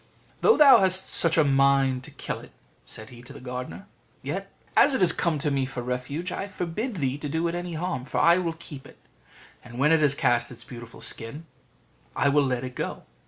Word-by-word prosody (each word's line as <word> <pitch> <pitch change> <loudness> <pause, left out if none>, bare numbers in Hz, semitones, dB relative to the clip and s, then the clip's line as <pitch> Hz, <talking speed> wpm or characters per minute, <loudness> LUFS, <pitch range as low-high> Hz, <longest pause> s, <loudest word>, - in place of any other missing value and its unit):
"Though 450 - +5
thou 285 -3 +8
hast 190 -1 +2
such 165 -1 +4
a 160 - +6
mind 135 -2 +2
to - - -10
kill - - -6
it," - - -14 0.4
said 110 +2 -8
he 120 -1 -12
to 125 +3 -13
the 145 - -11
gardener, 125 -8 -7 0.4
"yet, 190 +8 -5 0.2
as 280 -1 +5
it 180 -8 +3
came 170 -4 +1
to 145 +1 -1
me 135 -1 0
for 130 -2 -6
refuge, 135 +8 -4
I 195 - -4
forbid 200 +5 -4
thee 140 -4 -2
to 150 - -5
do 160 +3 -1
it 170 - -3
any 175 -1 -4
harm; 160 -6 -3
for - - -2
I 170 +2 +5
will 170 -2 -2
keep 145 -5 -10
it, - - -17 0.7
and 120 -1 -11
when 145 +4 +3
it 160 -1 +4
has 145 -2 +3
cast 120 -2 +1
its 120 -1 -11
beautiful 120 -1 -11
skin 130 +8 -4 0.7
I 140 - +2
will 145 -1 +3
let 125 -1 -2
it 125 -1 -6
go." - - -5
140 Hz, 215 wpm, -26 LUFS, 125-170 Hz, 0.7 s, thou